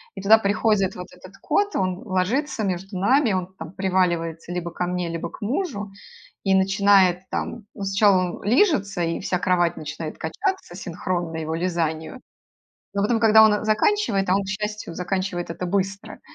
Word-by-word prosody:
И 195 Hz, -, -6 dB
туда 215 Hz, +3 st, +7 dB
приходит 205 Hz, -1 st, +1 dB
вот 180 Hz, +1 st, -7 dB
этот -, -, -15 dB
кот, 410 Hz, 0 st, +1 dB
он 185 Hz, -1 st, -1 dB
ложится 215 Hz, +6 st, -1 dB
между 190 Hz, +1 st, -3 dB
нами, 250 Hz, +3 st, +3 dB
он 185 Hz, 0 st, -3 dB
там 160 Hz, +1 st, -8 dB
приваливается 175 Hz, -3 st, -1 dB
либо 175 Hz, -1 st, -4 dB
ко 180 Hz, -, -3 dB
мне, 180 Hz, -1 st, -2 dB
либо 165 Hz, 0 st, -4 dB
к -, -, -13 dB
мужу 225 Hz, -, -2 dB, 0.5 s
и 195 Hz, -1 st, +2 dB
начинает 190 Hz, -2 st, +4 dB
там: 235 Hz, -3 st, -4 dB
ну, 200 Hz, -, -7 dB
сначала 195 Hz, -1 st, +4 dB, 0.2 s
он -, -, -13 dB
лижется, 205 Hz, -, +2 dB
и 165 Hz, +3 st, -2 dB
вся 180 Hz, -1 st, -1 dB
кровать 175 Hz, -2 st, +1 dB
начинает 155 Hz, +1 st, -6 dB
качаться 380 Hz, -, -3 dB
синхронно 175 Hz, -2 st, -3 dB
его 160 Hz, 0 st, -3 dB
лизанию. 165 Hz, +3 st, -2 dB, 0.8 s
Но 200 Hz, -, +2 dB
потом, 225 Hz, +2 st, +2 dB
когда 220 Hz, -1 st, +7 dB
он 215 Hz, 0 st, +4 dB
заканчивает, 215 Hz, -, +1 dB
а -, -, +5 dB
он, 200 Hz, -, -1 dB
к -, -, -9 dB
счастью, 210 Hz, -2 st, -4 dB
заканчивает 180 Hz, -1 st, -3 dB
это 175 Hz, +2 st, -4 dB
быстро, 195 Hz, +1 st, -3 dB
190 Hz, 170 wpm, -23 LUFS, 175-210 Hz, 0.8 s, туда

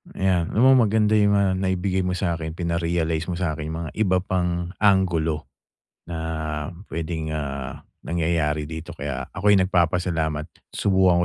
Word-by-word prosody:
Ayan, 90 Hz, -3 st, +1 dB
alam 115 Hz, -, +4 dB
mo 130 Hz, -4 st, +6 dB
maganda 105 Hz, 0 st, +2 dB
yung 100 Hz, 0 st, +4 dB
mga 95 Hz, -2 st, +2 dB
naibigay 95 Hz, 0 st, 0 dB
mo 90 Hz, 0 st, -1 dB
sa'kin. 85 Hz, -4 st, -2 dB
Pina-realize 85 Hz, -2 st, -1 dB
mo 90 Hz, -, -2 dB
sa'kin 80 Hz, -4 st, -2 dB
yung 80 Hz, -, -4 dB
mga -, -, -7 dB
iba 95 Hz, -4 st, +3 dB
pang 90 Hz, -2 st, -1 dB
anggulo 90 Hz, -6 st, +2 dB, 0.6 s
na 85 Hz, -1 st, -5 dB, 0.7 s
puwedeng, 80 Hz, -1 st, -3 dB
ah, 70 Hz, -3 st, -4 dB, 0.2 s
nangyayari 80 Hz, -3 st, 0 dB
dito, 80 Hz, +1 st, -7 dB
kaya 65 Hz, -3 st, -4 dB
ako'y 105 Hz, +2 st, +4 dB
nagpapasalamat. 85 Hz, -4 st, +1 dB, 0.3 s
Subukan 95 Hz, -3 st, +3 dB
85 Hz, 140 wpm, -24 LUFS, 80-95 Hz, 0.7 s, mo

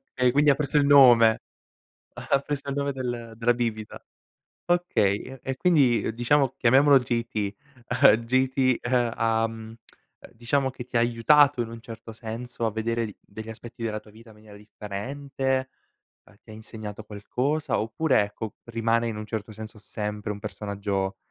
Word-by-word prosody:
Okay 125 Hz, -1 st, +3 dB
quindi 145 Hz, +3 st, +4 dB
ha 140 Hz, -, +5 dB
preso 150 Hz, 0 st, 0 dB
il 145 Hz, -, +4 dB
nome 120 Hz, -6 st, +7 dB, 0.8 s
ha -, -, 0 dB
preso 140 Hz, 0 st, -4 dB
il 140 Hz, -, -2 dB
nome 140 Hz, 0 st, -1 dB
del 120 Hz, -3 st, -5 dB
della 120 Hz, +1 st, +2 dB
bibita. 115 Hz, -3 st, -4 dB, 0.6 s
Okay 135 Hz, -, 0 dB
e 135 Hz, 0 st, -4 dB
quindi 140 Hz, -11 st, +3 dB
diciamo 130 Hz, +3 st, +2 dB
chiamiamolo 135 Hz, +3 st, +5 dB
J.T., 115 Hz, -4 st, -2 dB, 0.7 s
J.T. 130 Hz, +1 st, +1 dB
ehm, 120 Hz, -2 st, +1 dB
ahm, 115 Hz, 0 st, -1 dB, 0.6 s
diciamo 130 Hz, +4 st, 0 dB
che 125 Hz, -1 st, -8 dB
ti 125 Hz, -, -11 dB
ha -, -, +4 dB
aiutato 125 Hz, +3 st, +4 dB
in 115 Hz, -, -4 dB
un 115 Hz, 0 st, -9 dB
certo 115 Hz, -1 st, -10 dB
senso 115 Hz, +2 st, -6 dB
a 110 Hz, -, 0 dB
vedere 115 Hz, +1 st, -1 dB
d 105 Hz, -, -11 dB
degli 110 Hz, +2 st, -10 dB
aspetti 115 Hz, +1 st, -9 dB
della 110 Hz, -1 st, -2 dB
tua 105 Hz, 0 st, -19 dB
vita 115 Hz, +1 st, -16 dB
in 110 Hz, -, -16 dB
maniera 105 Hz, -1 st, -15 dB
differente, 130 Hz, +6 st, -4 dB, 0.7 s
ti -, -, -21 dB
ha -, -, -9 dB
insegnato 110 Hz, -1 st, -8 dB
qualcosa 125 Hz, +9 st, -2 dB
oppure 115 Hz, +4 st, +1 dB
ecco, 105 Hz, +1 st, -7 dB
rimane 115 Hz, 0 st, 0 dB
in 115 Hz, -, -4 dB
un 105 Hz, -, -6 dB
certo 110 Hz, 0 st, -5 dB
senso 110 Hz, +1 st, -10 dB
sempre 105 Hz, +1 st, -4 dB
un 100 Hz, -, -6 dB
personaggio, 100 Hz, -1 st, -3 dB
115 Hz, 160 wpm, -25 LUFS, 110-130 Hz, 0.8 s, nome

